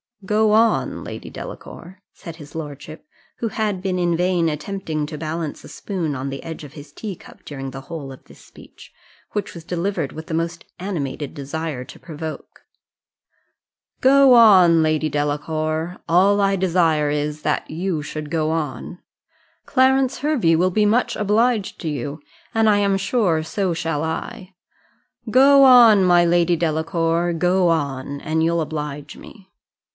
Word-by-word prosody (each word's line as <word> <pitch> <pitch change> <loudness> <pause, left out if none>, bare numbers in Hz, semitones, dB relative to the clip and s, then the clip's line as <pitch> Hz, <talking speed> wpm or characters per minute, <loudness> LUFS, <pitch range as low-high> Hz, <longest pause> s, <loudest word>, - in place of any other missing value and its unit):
"Go 215 +2 +2
on, 225 +1 +2
Lady - - -8
Delacour," 185 +3 -10
said 165 -2 -10
his 145 -3 -13
lordship, 155 - -8 0.3
who 230 - -2
had 210 -4 -2
been 185 -2 -1
in 175 -1 +1
vain 175 -2 +1
attempting 155 0 -4
to 150 - -7
balance 160 0 -5
a - - -11
spoon 170 -8 -4
on 130 +1 -4
the 135 0 -7
edge 160 -1 -7
of 145 -1 -11
his 145 -1 -12
teacup 195 +3 -9
during 135 -2 -6
the 135 +1 -8
whole 140 -1 -8
of 130 - -13
this - - -17
speech, - - -16 0.4
which 210 -1 -4
was 170 - -10
delivered 175 -3 -2
with 160 +1 -9
the 160 - -3
most 165 +1 -3
animated 150 -7 -4
desire 145 -1 -5
to - - -13
provoke 160 -1 -8 1.4
"Go 270 0 +6
on, 185 -8 +7
Lady 155 0 +1
Delacour 155 +3 -2
all 195 +4 +4
I 195 0 +2
desire 165 -5 +1
is, 150 +1 -3
that - - -1
you 170 0 -2
should 150 +1 -6
go 160 -2 0
on; 160 +2 -4 0.7
Clarence 265 0 +2
Hervey 265 - +2
will 180 +3 +2
be 210 +3 +2
much 225 +4 +1
obliged 215 +1 0
to 165 - -3
you, 145 +1 -5 0.3
and 225 -1 +4
I 205 - +4
am 200 -1 +2
sure 195 -5 +1
so 185 +2 -2
shall 160 -2 -2
I. 180 +4 -5 0.8
Go 275 +3 +6
on, 235 -6 +7
my 175 -1 +5
Lady 175 0 +3
Delacour 165 +1 0
go 180 +2 +2
on, 140 -3 -2
and 160 +1 -1
you'll 170 0 +1
oblige 150 -2 -5
me." 195 -4 -14
165 Hz, 155 wpm, -21 LUFS, 155-195 Hz, 1.4 s, on